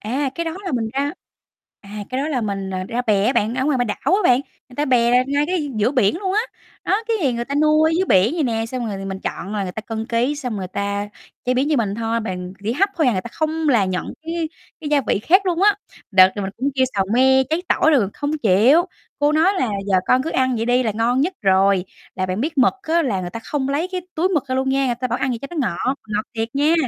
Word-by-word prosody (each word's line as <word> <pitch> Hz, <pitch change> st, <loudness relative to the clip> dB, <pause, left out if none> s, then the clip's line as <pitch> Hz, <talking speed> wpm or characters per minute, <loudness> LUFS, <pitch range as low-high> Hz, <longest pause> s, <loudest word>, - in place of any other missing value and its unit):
À, 265 Hz, +5 st, -2 dB
cái 335 Hz, -, -3 dB
đó 325 Hz, -, -3 dB
là 370 Hz, -, -3 dB
mình 225 Hz, -3 st, -1 dB
ra 285 Hz, +2 st, 0 dB, 0.7 s
à, 205 Hz, +1 st, -9 dB
cái 255 Hz, -, -2 dB
đó 305 Hz, -, -2 dB
là 260 Hz, -5 st, -1 dB
mình, 195 Hz, -3 st, -3 dB
à, 185 Hz, 0 st, -3 dB
ra 245 Hz, +2 st, -1 dB
bè 210 Hz, -3 st, +2 dB
á 255 Hz, -, +3 dB
bạn, 210 Hz, -, +1 dB
ở 260 Hz, +1 st, -1 dB
ngoài -, -, 0 dB
ngoài 280 Hz, -4 st, +1 dB
b -, -, +2 dB
đảo 340 Hz, -, 0 dB
á -, -, 0 dB
bạn, 250 Hz, -2 st, +5 dB, 0.3 s
người 245 Hz, -, -16 dB
ta 295 Hz, -, +1 dB
bè 250 Hz, -1 st, +3 dB
ngay 285 Hz, +1 st, +1 dB
cái 335 Hz, -5 st, -1 dB
giữa 215 Hz, +4 st, +2 dB
biển 250 Hz, -, +2 dB
luôn 380 Hz, -2 st, -2 dB
á. 430 Hz, -, +3 dB, 0.4 s
Đó, 420 Hz, +3 st, +1 dB, 0.2 s
cái 265 Hz, -3 st, +2 dB
người 235 Hz, 0 st, -3 dB
ta 280 Hz, -, -5 dB
nuôi 305 Hz, +1 st, +4 dB
ở -, -, -1 dB
dưới 380 Hz, -, +2 dB
biển 200 Hz, -, +4 dB
vậy 325 Hz, -, 0 dB
nè, 225 Hz, -2 st, -1 dB
xong 245 Hz, -1 st, -4 dB
rồi 195 Hz, -2 st, -5 dB
mình 190 Hz, 0 st, -5 dB
chọn 195 Hz, +4 st, -5 dB
là 205 Hz, -, -1 dB
người 180 Hz, -1 st, -4 dB
ta 220 Hz, -, -5 dB
cân 225 Hz, 0 st, -5 dB
ký, 245 Hz, +5 st, 0 dB
xong 250 Hz, -7 st, -4 dB
người 185 Hz, -2 st, -4 dB
ta 200 Hz, +1 st, -3 dB, 0.4 s
chế 250 Hz, +1 st, +1 dB
biến 270 Hz, +4 st, +1 dB
như 300 Hz, -, +2 dB
mình 205 Hz, -4 st, 0 dB
thôi, 230 Hz, +1 st, -1 dB
bàn 180 Hz, -3 st, -5 dB
chỉ 225 Hz, -, 0 dB
hấp 395 Hz, +9 st, +2 dB
thôi 315 Hz, -5 st, +2 dB
à, 245 Hz, -, +4 dB
người 185 Hz, -, -1 dB
ta -, -, -7 dB
không 315 Hz, 0 st, -1 dB
là 230 Hz, -7 st, +4 dB
nhận 185 Hz, -1 st, -3 dB
cái 330 Hz, 0 st, -3 dB, 0.3 s
cái 300 Hz, -, -5 dB
gia 290 Hz, -, +4 dB
vị -, -, +2 dB
khác 375 Hz, -, +3 dB
luôn 355 Hz, +1 st, 0 dB
á. 415 Hz, -, +7 dB, 0.4 s
Đợt 190 Hz, -1 st, +7 dB
là 205 Hz, -, -2 dB
mình 190 Hz, -, -3 dB
cũng 275 Hz, +3 st, 0 dB
kêu 260 Hz, -1 st, +3 dB
xào 195 Hz, -1 st, +1 dB
me, 265 Hz, +1 st, +5 dB
cháy 325 Hz, +3 st, 0 dB
tỏi 315 Hz, -, +3 dB
rồi 230 Hz, -10 st, +3 dB
không 295 Hz, +1 st, -2 dB
chịu, 230 Hz, -, +5 dB, 0.4 s
cô 290 Hz, +1 st, +2 dB
nói 330 Hz, +6 st, +4 dB
là 250 Hz, -, +1 dB, 0.2 s
"Giờ 190 Hz, -, +3 dB
con 255 Hz, +1 st, +3 dB
cứ 325 Hz, -, -3 dB
ăn 255 Hz, -2 st, +1 dB
vậy 225 Hz, +1 st, -2 dB
đi 250 Hz, +1 st, +3 dB
là 220 Hz, -, 0 dB
ngon 240 Hz, +4 st, +1 dB
nhất 355 Hz, +6 st, +1 dB
rồi." 195 Hz, -1 st, +3 dB, 0.3 s
Là 185 Hz, 0 st, -2 dB
bạn 185 Hz, +4 st, -2 dB
biết 305 Hz, +1 st, -2 dB
mực 250 Hz, -, +4 dB
á, 335 Hz, 0 st, +1 dB
là 200 Hz, -9 st, -1 dB
người 175 Hz, -1 st, -5 dB
ta 230 Hz, -, -7 dB
không 275 Hz, -2 st, -2 dB
lấy 305 Hz, +6 st, -1 dB
cái 365 Hz, -, -2 dB
túi 340 Hz, +4 st, +1 dB
mực 310 Hz, -7 st, 0 dB
ra 260 Hz, -, -1 dB
luôn 265 Hz, 0 st, 0 dB
nha, 270 Hz, 0 st, +1 dB
người 240 Hz, -, 0 dB
ta 255 Hz, +2 st, -3 dB
bảo 240 Hz, +3 st, -1 dB
ăn 265 Hz, -, 0 dB
vậy 235 Hz, -, -2 dB
cho 275 Hz, -, -7 dB
nó 345 Hz, -, -7 dB
ngọt, 255 Hz, +10 st, -1 dB
ngọt 210 Hz, 0 st, -1 dB
thiệt 225 Hz, +2 st, -3 dB
nha. 300 Hz, +4 st, +3 dB
255 Hz, 285 wpm, -20 LUFS, 215-295 Hz, 0.7 s, á